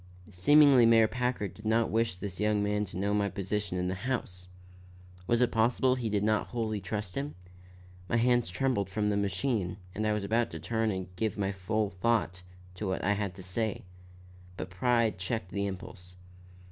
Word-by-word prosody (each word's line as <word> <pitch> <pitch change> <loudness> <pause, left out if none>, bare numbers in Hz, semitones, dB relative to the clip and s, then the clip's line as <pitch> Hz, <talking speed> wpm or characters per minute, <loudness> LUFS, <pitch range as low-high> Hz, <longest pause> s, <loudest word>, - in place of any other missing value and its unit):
Seemingly 135 +5 +6
Mayor 115 -1 +6
Packard 125 -5 -2
did 105 - -14
not 115 +1 +2
wish 115 -3 +1
this 95 0 -6
young 105 -1 +2
man 105 0 0
to 90 - -9
know 100 +2 0
my 100 -1 +1
position 100 -1 -3
in 90 0 -1
the 90 - -1
house. 95 -5 -4 0.8
Was 120 +1 +2
it 125 - +3
possible 120 +3 +3
he 125 -3 -2
did 105 -1 0
not 110 0 +1
wholly 110 -3 -2
trust 95 0 -4
him? 140 +2 -4 0.7
My - - +1
hands 120 -2 +3
trembled 100 0 0
from 105 +1 0
the - - 0
machine 100 -1 -1 0.2
and 110 +1 -1
I 105 - +2
was 105 -1 -2
about 115 +3 +1
to 80 - -7
turn 110 +5 -1
and 95 -2 -4
give 110 0 -1
my 100 -1 0
full 100 +2 -1
thought 95 -2 0 0.4
to 105 - -3
what 95 - -2
I 105 - +3
had 100 -3 -3
to 95 - -10
say. 105 +3 -3 0.7
But 90 - -6
pride 115 +1 +1
checked 95 0 -3
the 100 0 -1
impulse. 90 -1 -8
105 Hz, 190 wpm, -30 LUFS, 95-115 Hz, 0.8 s, Seemingly